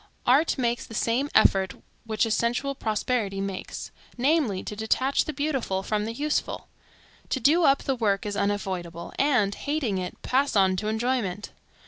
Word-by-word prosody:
Art 285 Hz, +7 st, +4 dB
makes 240 Hz, -2 st, 0 dB
the 225 Hz, -, -10 dB
same 245 Hz, +7 st, +1 dB
effort 190 Hz, -1 st, +4 dB, 0.3 s
which 220 Hz, +1 st, +1 dB
a 225 Hz, -, -2 dB
sensual 240 Hz, +5 st, 0 dB
prosperity 215 Hz, -3 st, -1 dB
makes; 195 Hz, -1 st, -5 dB, 0.3 s
namely 255 Hz, -, +1 dB
to 210 Hz, -, -6 dB
detach 255 Hz, +6 st, +1 dB
the -, -, -3 dB
beautiful 270 Hz, -10 st, -1 dB
from 210 Hz, +1 st, -1 dB
the 225 Hz, -, -4 dB
useful, 295 Hz, +5 st, -2 dB, 0.6 s
to 265 Hz, -, 0 dB
do 315 Hz, +7 st, +4 dB
up 275 Hz, -1 st, +4 dB
the 270 Hz, -, 0 dB
work 205 Hz, -5 st, 0 dB
as 205 Hz, -1 st, -3 dB
unavoidable, 185 Hz, -5 st, -3 dB
and, 250 Hz, -8 st, +3 dB
hating 275 Hz, -7 st, -2 dB
it, 180 Hz, -1 st, -6 dB
pass 270 Hz, +1 st, +1 dB
on 190 Hz, -2 st, +4 dB
to 210 Hz, -, -2 dB
enjoyment. 220 Hz, -3 st, -1 dB
225 Hz, 160 wpm, -26 LUFS, 200-270 Hz, 0.6 s, Art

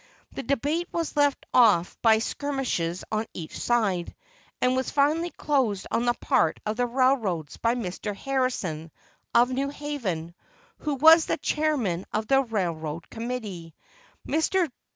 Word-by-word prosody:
The -, -, -5 dB
debate 290 Hz, +7 st, -1 dB
was 335 Hz, -2 st, -3 dB
led 290 Hz, -1 st, +4 dB, 0.2 s
off 210 Hz, -8 st, +4 dB
by 220 Hz, -1 st, +5 dB
skirmishers 230 Hz, -, -2 dB
on 215 Hz, +1 st, -1 dB
each 160 Hz, -3 st, -7 dB
side, 200 Hz, -8 st, 0 dB, 0.4 s
and 250 Hz, 0 st, +2 dB
was 260 Hz, 0 st, -1 dB
finally 305 Hz, +5 st, +2 dB
closed 260 Hz, -, 0 dB
on 235 Hz, -, +1 dB
the 240 Hz, 0 st, +2 dB
part 160 Hz, -, +1 dB
of 215 Hz, +1 st, -2 dB
the 245 Hz, 0 st, +1 dB
railroads 235 Hz, -, +1 dB
by 230 Hz, +1 st, +1 dB
Mr. 205 Hz, -2 st, -4 dB
Harrison, 205 Hz, -, -2 dB, 0.5 s
of 245 Hz, +2 st, +5 dB
New 270 Hz, +2 st, -1 dB
Haven, 235 Hz, -, -4 dB, 0.5 s
who 300 Hz, -2 st, -2 dB
was 320 Hz, +4 st, +7 dB
chairman 255 Hz, -, 0 dB
of 215 Hz, 0 st, -1 dB
the 270 Hz, +3 st, +4 dB
railroad 170 Hz, -, -3 dB
committee. 220 Hz, -9 st, -5 dB, 0.5 s
Mr. 320 Hz, +1 st, +1 dB
240 Hz, 135 wpm, -26 LUFS, 190-280 Hz, 0.5 s, was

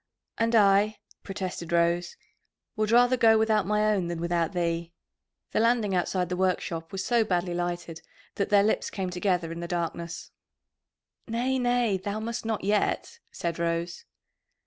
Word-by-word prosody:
"And 230 Hz, +1 st, +2 dB
I," 205 Hz, 0 st, +4 dB, 0.2 s
protested 185 Hz, -3 st, -5 dB
Rose, 170 Hz, +1 st, +1 dB, 0.6 s
"would 215 Hz, 0 st, 0 dB
rather 245 Hz, +2 st, +5 dB
go 225 Hz, -2 st, +5 dB
without 220 Hz, -3 st, +2 dB
my 210 Hz, +1 st, +2 dB
own 185 Hz, -4 st, -1 dB
than 170 Hz, -1 st, -4 dB
without 170 Hz, -1 st, 0 dB
thee." 170 Hz, -1 st, -2 dB, 0.6 s
The -, -, +1 dB
landing 230 Hz, -3 st, +2 dB
outside 180 Hz, 0 st, 0 dB
the 180 Hz, -, -2 dB
workshop 180 Hz, -3 st, -1 dB
was 195 Hz, -1 st, -4 dB
so 240 Hz, -2 st, +3 dB
badly 180 Hz, -3 st, -1 dB
lighted 175 Hz, -1 st, -4 dB, 0.3 s
that 200 Hz, -, -2 dB
their 205 Hz, -1 st, +5 dB
lips 215 Hz, -, 0 dB
came 190 Hz, -3 st, -4 dB
together 180 Hz, -2 st, 0 dB
in 165 Hz, -, -6 dB
the 170 Hz, -, -5 dB
darkness. 170 Hz, -1 st, -4 dB, 1.0 s
"Nay, 250 Hz, +3 st, 0 dB
nay, 245 Hz, -4 st, +2 dB
thou 205 Hz, +3 st, -4 dB
must 230 Hz, +1 st, -4 dB
not 220 Hz, -4 st, -2 dB
yet," 210 Hz, -, 0 dB
said 170 Hz, -1 st, -4 dB
Rose. 170 Hz, +1 st, -2 dB
190 Hz, 155 wpm, -27 LUFS, 170-220 Hz, 1.0 s, rather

